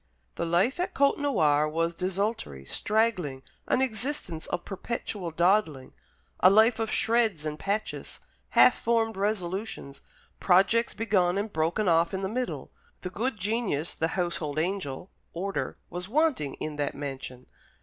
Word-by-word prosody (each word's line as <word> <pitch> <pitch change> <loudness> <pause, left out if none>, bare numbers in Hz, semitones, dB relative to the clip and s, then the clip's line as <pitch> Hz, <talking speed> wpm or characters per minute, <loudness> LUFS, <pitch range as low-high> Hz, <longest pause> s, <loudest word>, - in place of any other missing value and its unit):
The 170 - -3
life 185 - +2
at 365 +1 -2
Côtenoir 160 - +3
was 165 +1 0
desultory, 185 - -2
straggling; 185 - 0 0.2
an 260 - +2
existence 245 - -3
of 175 - -3
perpetual 195 -2 -4
dawdling; 165 -5 +1 0.5
a 185 - +7
life 220 +3 +5
of 225 -1 -1
shreds 220 -10 +2
and 150 0 -4
patches, 210 +2 -3 0.4
half 250 - +8
formed 225 -1 +1
resolutions, 190 -6 -3 0.4
projects 195 +6 +3
begun 195 -5 +2
and 205 +1 -3
broken 165 +6 0
off 170 +2 +3
in 190 - -3
the - - 0
middle. 250 +3 -3 0.3
The 180 - -5
good 230 +4 -2
genius, 200 -6 -1
the 160 - 0
household 170 -4 -2
angel, 180 -1 -2 0.2
order, 195 +3 -3
was 180 +2 -5
wanting 275 - +1
in 155 -1 -5
that 145 -1 -2
mansion. 135 -3 -6
190 Hz, 140 wpm, -28 LUFS, 160-225 Hz, 0.5 s, half